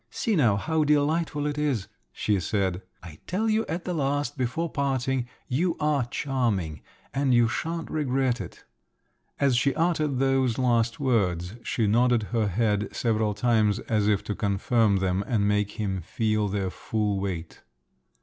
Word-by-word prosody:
"See 225 -3 -1
now, 120 - +4
how 155 +9 0
delightful 150 +1 +1
it 150 0 -2
is," 135 -10 0 0.2
she 105 -2 0
said. 95 +1 -1 0.2
"I 80 -3 -11
tell 205 +5 0
you 220 +1 +1
at 170 +2 -4
the 180 - -2
last, 145 -2 -1
before 130 +6 -1
parting, 135 -4 -1 0.2
you 165 +7 0
are 150 -4 +1
charming, 115 - -1 0.3
and 135 -2 +2
you 120 -1 +5
shan't 165 +7 -3
regret 130 -5 0
it." 90 - -10 0.7
As 140 -3 +3
she 135 +3 +2
uttered 155 -4 +1
those 135 -3 +2
last 115 -3 +1
words, 95 - 0
she 115 - -1
nodded 120 +2 +3
her 110 -3 +2
head 105 +1 +1
several 110 -3 0
times 110 -2 +2
as 105 -2 0
if 105 -2 +2
to 105 - -3
confirm 105 +2 +1
them 95 0 0
and 105 -5 +1
make 105 0 +1
him 95 -4 -2
feel 110 +4 0
their 95 -2 -2
full 105 -1 -1
weight. 90 -4 -5
120 Hz, 160 wpm, -26 LUFS, 105-140 Hz, 0.7 s, you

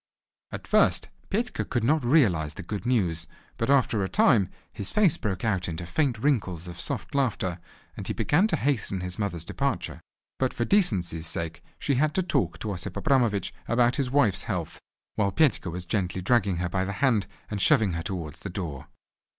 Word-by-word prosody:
At - - -6
first, - - +3 0.2
Petka 230 +5 -1
could 120 -3 -2
not 150 +4 +2
realize 95 - +3
the - - -7
good 105 +6 -5
news, 85 -10 +1 0.3
but 115 - -1
after 125 -7 +3
a 95 - -2
time 125 - +4 0.2
his 100 - -2
face 195 -6 +4
broke 100 - -3
out 95 -5 0
into 85 +1 -5
faint 130 - 0
wrinkles 100 - 0
of 85 - -8
soft - - -4
laughter, 110 -10 0 0.4
and - - -7
he - - -1
began 180 +9 +3
to - - +1
hasten 110 -9 -1
his 90 +2 -4
mother's 85 -6 -2
departure. - - -2 0.4
But 130 -1 0
for 120 - 0
decency's 90 - +2
sake 85 -1 -1 0.2
she 140 - 0
had 155 -1 +1
to 185 - +2
talk 85 - 0
to 105 - -2
Osip 90 -3 -4
Abramovich 120 - +1
about 120 +1 +3
his 135 -3 0
wife's 125 -8 +2
health, - - -3 0.4
while 100 -2 +2
Petka 140 - +2
was 90 +2 -5
gently 95 -1 -1
dragging 100 -2 +2
her 90 0 -1
by 95 +1 0
the 100 +1 -3
hand 110 -4 +2 0.2
and 105 -2 -2
shoving 110 -9 +4
her 85 - -2
towards 85 -4 -5
the 100 - -6
door. 85 -8 -5
100 Hz, 190 wpm, -27 LUFS, 90-130 Hz, 0.4 s, time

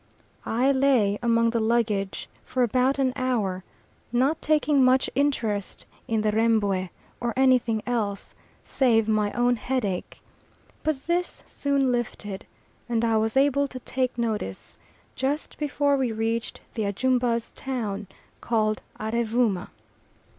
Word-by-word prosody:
I 250 +5 +2
lay 260 -7 +3
among 230 -1 +3
the 230 - 0
luggage 220 -3 0 0.2
for 255 - 0
about 255 +4 +2
an 260 -2 +1
hour, 215 -8 -1 0.5
not 260 +6 +1
taking 300 -2 +3
much 255 +1 +3
interest 235 -8 -1 0.2
in 220 -1 +1
the 215 0 +1
Rembwe 210 -4 +1 0.3
or 240 -1 -2
anything 250 -4 +3
else, 215 -5 -2 0.3
save 225 -5 +2
my 210 -1 +1
own 245 0 +2
headache; 215 -6 -3 0.6
but 300 -3 -2
this 350 +1 -1
soon 280 -2 0
lifted, 215 -5 -4 0.4
and 235 -1 +1
I 225 -1 +2
was 220 +3 0
able 280 +1 +3
to 255 -1 -8
take 255 -1 -2
notice, 215 - -3 0.4
just 280 +4 -2
before 285 -1 +1
we 260 -3 0
reached 225 +1 -2
the 220 -3 -2
Ajumba's 240 +2 0
town, 215 -7 -4 0.3
called 215 -2 0 0.2
Arevooma. 225 -3 0
235 Hz, 125 wpm, -25 LUFS, 215-260 Hz, 0.6 s, lay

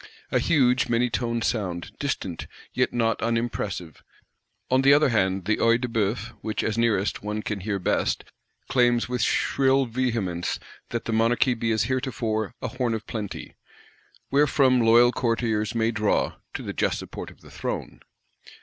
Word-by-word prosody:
A - - +3
huge, 125 -5 +3
many 120 +1 +2
toned 115 -1 -1
sound; 90 -7 -2
distant, 100 - -3 0.3
yet - - +1
not 115 -2 0
unimpressive. 115 -7 -2 0.7
On 130 0 +4
the 140 +1 +7
other 145 -1 +4
hand, 95 -5 +1
the 110 +2 +1
Œil 115 +1 +3
de 125 - -2
Bœuf, 115 0 -1
which, 110 0 -2
as 110 - -1
nearest, 110 -4 +1
one 105 +1 -3
can 105 -2 -3
hear 100 +1 -2
best, 90 - 0 0.4
claims 120 -2 +3
with 125 -1 -2
shrill 135 +4 +2
vehemence 115 -8 -1 0.3
that 120 - -3
the 115 - -2
Monarchy 115 +3 +3
be 115 -1 -1
as 110 -2 +2
heretofore 115 -3 -2
a - - 0
Horn 125 -3 -1
of 110 0 -6
Plenty; 105 -3 -6 0.8
wherefrom 135 -3 +4
loyal 120 +2 +6
courtiers 115 -3 0
may 115 0 +2
draw,—to 105 -2 -1
the - - -5
just - - 0
support - - -7
of - - -18
the - - -15
throne. - - -5
115 Hz, 160 wpm, -25 LUFS, 105-125 Hz, 0.8 s, the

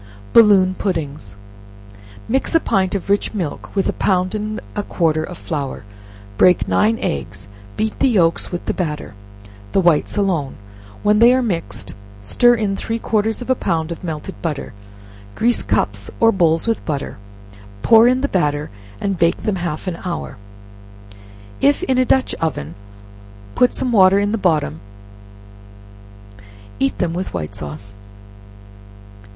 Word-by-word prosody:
Balloon 200 -5 +6
Puddings. 150 - -4 0.9
Mix 265 +7 0
a - - +7
pint 190 - 0
of 195 - -4
rich 200 +2 0
milk 175 -8 -4
with 195 - +1
a - - 0
pound 185 -1 0
and 215 0 -3 0.2
a 205 - 0
quarter 160 -5 0
of 180 0 -8
flour; 145 - -4 0.6
break 180 - +5
nine 220 +2 +2
eggs; 95 +8 -3 0.3
beat 220 0 -2
the 270 - +4
yelks 170 -8 +2
with 175 - -5
the - - -1
batter, 150 - -4 0.6
the - - +3
whites 170 -2 +2
alone; 175 -9 0 0.5
when 210 0 +3
they 235 +2 +7
are 260 - +1
mixed, 170 - -3 0.3
stir 240 - +3
in 210 -4 -1
three 225 +3 -3
quarters 225 +1 -1
of 245 - -13
a - - +6
pound 165 -8 -2
of 170 - -7
melted 160 +2 -5
butter; 150 -7 -4 0.6
grease 235 +1 +2
cups - - -1
or 225 -1 +5
bowls 165 -5 +2
with 230 -2 -1
butter; 145 -3 -4 0.7
pour 225 +1 +7
in 255 +1 +2
the 280 - +1
batter, 150 - -1 0.3
and 195 -3 -2
bake 170 0 +2
them 210 -3 0
half 170 -2 -4
an 180 -3 -4
hour; 180 -9 -5 1.2
if 285 +5 +3
in 260 -7 +1
a 255 - +3
dutch 260 +1 +2
oven, 85 - -2 0.8
put 250 - +3
some 255 - -2
water 195 -3 +6
in 205 0 +1
the 225 - 0
bottom; 155 - 0 2.0
eat 135 - 0
them 170 -2 -1
with 180 - -4
white 75 -3 -4
sauce. 75 +8 -8
185 Hz, 150 wpm, -19 LUFS, 155-215 Hz, 2.0 s, a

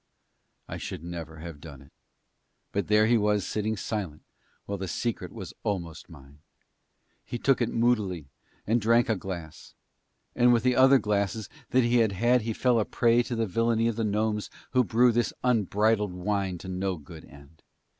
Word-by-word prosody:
I - - -6
should 75 - -6
never 85 -2 -7
have 85 -3 -9
done 75 -5 -10
it; 70 - -21 0.8
but 100 - -2
there 105 +1 +4
he 115 +1 +3
was 105 -1 +1
sitting 110 0 -2
silent 95 -7 -4 0.4
while 100 -1 -4
the 95 - -4
secret 115 +6 -3
was - - -8
almost 85 -5 -4
mine. 70 -2 -15 0.8
He 120 - -5
took 135 +1 +2
it 120 - +1
moodily 105 - 0 0.4
and 115 +2 +1
drank 115 +3 +3
a 110 - +3
glass; 85 -4 -8 0.6
and 120 0 +5
with 115 -2 +3
the 125 -1 +3
other 130 +2 +7
glasses 105 -2 -1 0.2
that 130 0 +3
he 120 +1 +2
had 110 -4 +3
had 120 +5 +3
he 115 +1 -3
fell 125 +1 +2
a 105 - +1
prey 120 0 +3
to 120 0 -4
the 115 0 0
villainy 115 +3 +1
of 115 - -1
the 115 - -1
gnomes 105 0 -1 0.2
who 125 -1 +4
brew 120 +2 +4
this 120 -1 0
unbridled 105 -3 +2
wine 95 0 -2
to 95 - -10
no 95 0 -2
good 80 +1 -12
end. 70 +3 -17
105 Hz, 180 wpm, -27 LUFS, 90-115 Hz, 0.8 s, other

